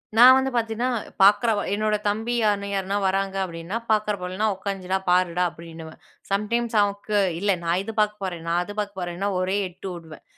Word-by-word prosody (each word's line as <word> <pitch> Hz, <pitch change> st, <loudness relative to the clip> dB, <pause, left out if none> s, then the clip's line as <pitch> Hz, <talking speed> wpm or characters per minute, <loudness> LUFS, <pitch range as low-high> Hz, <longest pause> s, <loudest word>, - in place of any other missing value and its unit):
நான் 250 Hz, +3 st, +9 dB
வந்து 265 Hz, 0 st, +1 dB
பாத்தீங்கன்னா, 230 Hz, +2 st, 0 dB, 0.3 s
பாக்குறவ 210 Hz, +2 st, +4 dB
என்னோட 215 Hz, 0 st, +1 dB
தம்பி 220 Hz, +4 st, -2 dB
யார், 205 Hz, -2 st, +2 dB
யாருனா 195 Hz, +1 st, -1 dB
வராங்க 195 Hz, 0 st, 0 dB
அப்பிடின்னா, 170 Hz, +3 st, -5 dB
"பாக்குற 215 Hz, -1 st, +2 dB
போலன்னா, 185 Hz, +4 st, -2 dB
உக்காந்திர்டா 190 Hz, -1 st, -3 dB
பாருடா!" 180 Hz, 0 st, +2 dB
அப்பிடின்னுவேன். 165 Hz, -1 st, -11 dB, 0.3 s
சம் 200 Hz, +2 st, 0 dB
டைம்ஸ் 235 Hz, -1 st, 0 dB
அவனுக்கு 205 Hz, +1 st, -1 dB, 0.2 s
"இல்ல 200 Hz, +2 st, +1 dB
நான் 170 Hz, +2 st, +1 dB
இது 225 Hz, -, -6 dB
பாக்கப் 210 Hz, -1 st, +1 dB
போறேன், 175 Hz, -3 st, -4 dB
நான் 170 Hz, +1 st, +1 dB
அது 205 Hz, -, -8 dB
பாக்கப் 200 Hz, -2 st, -4 dB
போறேன்னா" 175 Hz, +2 st, -3 dB
ஒரே 185 Hz, +1 st, 0 dB
எட்டு 180 Hz, +2 st, -10 dB
உடுவேன். 160 Hz, -3 st, -12 dB
195 Hz, 175 wpm, -24 LUFS, 180-215 Hz, 0.3 s, நான்